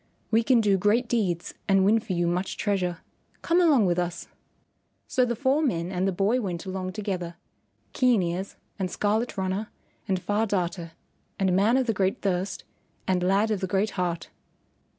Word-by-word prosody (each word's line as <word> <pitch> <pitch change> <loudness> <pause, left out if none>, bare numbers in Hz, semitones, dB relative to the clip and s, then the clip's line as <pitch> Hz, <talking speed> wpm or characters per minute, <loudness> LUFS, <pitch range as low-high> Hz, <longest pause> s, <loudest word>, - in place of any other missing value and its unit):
"We 225 +1 +4
can 235 0 +4
do 200 -3 +2
great 215 +5 +2
deeds 190 -8 -1
and 195 -1 +4
win 220 +3 +4
for 220 -3 -5
you 175 -1 +1
much 180 +3 -1
treasure. 185 -5 -1 0.4
Come 340 +2 +3
along 290 - +5
with 175 -1 +1
us." 175 -1 -3 0.8
So 255 -2 +2
the 240 -1 -1
four 275 +5 +2
men 180 - -1
and 185 +1 0
the - - +2
boy 200 +7 +1
went 180 -4 -4
along 185 -1 -4
together, 185 -5 -4 0.6
Keen 245 -7 +3
Ears, 175 +3 -3 0.2
and 185 -1 -1
Scarlet 215 +5 -1
Runner, 190 +3 -2 0.4
and 190 -2 0
Far 205 +4 0
Darter, 175 -4 -2 0.4
and 190 -2 +2
Man 215 +6 +4
of 260 - +1
the 225 - +1
Great 190 -1 -1
Thirst, 190 0 -1 0.4
and 185 -1 +1
Lad 195 +4 +2
of 210 - 0
the 190 - -2
Great 195 +3 0
Heart. 175 -3 -3
195 Hz, 180 wpm, -26 LUFS, 180-220 Hz, 0.8 s, along